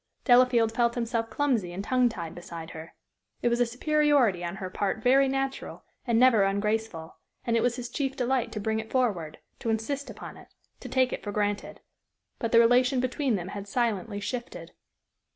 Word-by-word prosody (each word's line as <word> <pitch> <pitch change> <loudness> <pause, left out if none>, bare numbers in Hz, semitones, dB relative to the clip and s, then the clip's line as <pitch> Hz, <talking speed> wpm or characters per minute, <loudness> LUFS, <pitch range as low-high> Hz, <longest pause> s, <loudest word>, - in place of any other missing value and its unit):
Delafield 245 -3 +5
felt 235 0 +1
himself 230 -1 -2
clumsy 245 -11 0
and 185 +3 -5
tongue 250 +2 +2
tied 170 -7 -6
beside 170 -2 -9
her. 160 +1 -10 0.5
It 240 - +3
was 235 0 0
a 245 - +3
superiority 270 - +2
on 170 +1 -4
her 190 -1 -5
part 205 +3 -2
very 270 +2 +5
natural 270 0 -3 0.2
and 235 -1 +2
never 250 -4 +6
ungraceful, 200 -3 -1 0.3
and 235 - +1
it 230 - +3
was 245 -1 +1
his 245 -1 -5
chief 270 +2 -3
delight 245 -2 0
to 215 - -4
bring 220 +1 -1
it 220 0 -7
forward, 200 -13 -1 0.2
to 230 - -3
insist 245 +6 -2
upon - - -9
it, - - -15 0.3
to - - -9
take 260 -1 +2
it - - -5
for 205 - -4
granted. 205 0 -2 0.6
But 230 - -2
the 230 - +5
relation 250 +2 +4
between 255 0 0
them 180 -1 -4
had 200 0 -7
silently 220 -2 -1
shifted. 240 +4 -6
230 Hz, 190 wpm, -27 LUFS, 205-250 Hz, 0.6 s, never